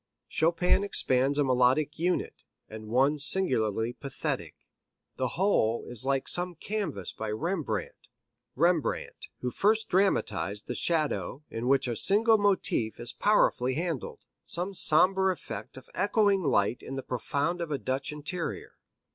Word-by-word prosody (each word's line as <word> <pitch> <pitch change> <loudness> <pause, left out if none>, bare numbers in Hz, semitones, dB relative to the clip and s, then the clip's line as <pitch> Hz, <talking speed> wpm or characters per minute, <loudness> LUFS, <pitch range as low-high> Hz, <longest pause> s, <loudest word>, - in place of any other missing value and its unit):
Chopin 170 +4 +2
expands 135 -7 +1
a 145 - +3
melodic 130 +4 +2
unit, 180 +2 -1 0.2
and 110 0 -9
one 135 +6 +2
singularly 120 - 0
pathetic. 140 0 -5 0.6
The 130 - 0
whole 145 - +1
is 125 +1 0
like 135 -1 0
some 180 0 0
canvas 165 - -3
by 110 - -5
Rembrandt, 145 - -3 0.5
Rembrandt 170 +1 0
who 125 - -2
first 215 - +1
dramatized 180 - 0
the - - -4
shadow 150 - -1
in 115 +2 -4
which 135 0 +3
a 120 - -2
single 220 - +4
motif 185 - +1
is 120 +1 -3
powerfully 130 -11 +2
handled; 165 -3 -4 0.2
some 180 +3 +1
sombre 190 +3 +3
effect 180 - -7
of 130 - -12
echoing 200 0 +2
light 120 - +1
in 135 - -7
the 135 - -5
profound 145 +7 -2
of 170 - -3
a 145 - -1
Dutch 135 +3 -3
interior. 160 +4 -5
150 Hz, 140 wpm, -28 LUFS, 125-180 Hz, 0.6 s, single